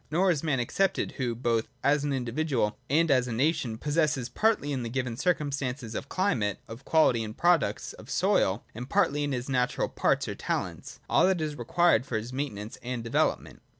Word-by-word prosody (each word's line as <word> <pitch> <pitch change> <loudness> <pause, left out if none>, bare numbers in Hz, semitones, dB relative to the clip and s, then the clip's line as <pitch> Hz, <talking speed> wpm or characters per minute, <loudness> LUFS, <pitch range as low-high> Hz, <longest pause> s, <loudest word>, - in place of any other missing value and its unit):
Nor 180 +5 +3
is 155 -5 0
man 150 -5 0
excepted, 190 +11 0
who, 120 -3 -1
both 115 -1 0 0.2
as 145 0 +3
an 145 - -1
individual 125 -3 -1
and 160 +3 +3
as 130 -2 +3
a - - -4
nation, 125 -2 0
possesses 145 -3 0
partly 210 - +1
in 135 -3 -1
the 115 - -4
given 125 -1 -2
circumstances 140 -6 -1
of 135 - -5
climate, 120 - 0
of 115 +3 -9
quality 125 -8 +3
and 110 0 -7
products 175 -1 +2
of - - -13
soil, - - +1
and 120 +4 -7
partly 145 +1 +2
in 145 - -1
his 125 -1 -3
natural 125 -2 0
parts - - +1
or - - -3
talents, - - -4
all - - +4
that 190 -2 +2
is 155 -2 -2
required 140 +2 +2
for 115 - -1
his 115 +4 -6
maintenance 115 -6 -4
and 125 -1 -4
development. 140 +7 -1
135 Hz, 190 wpm, -28 LUFS, 120-155 Hz, 0.2 s, all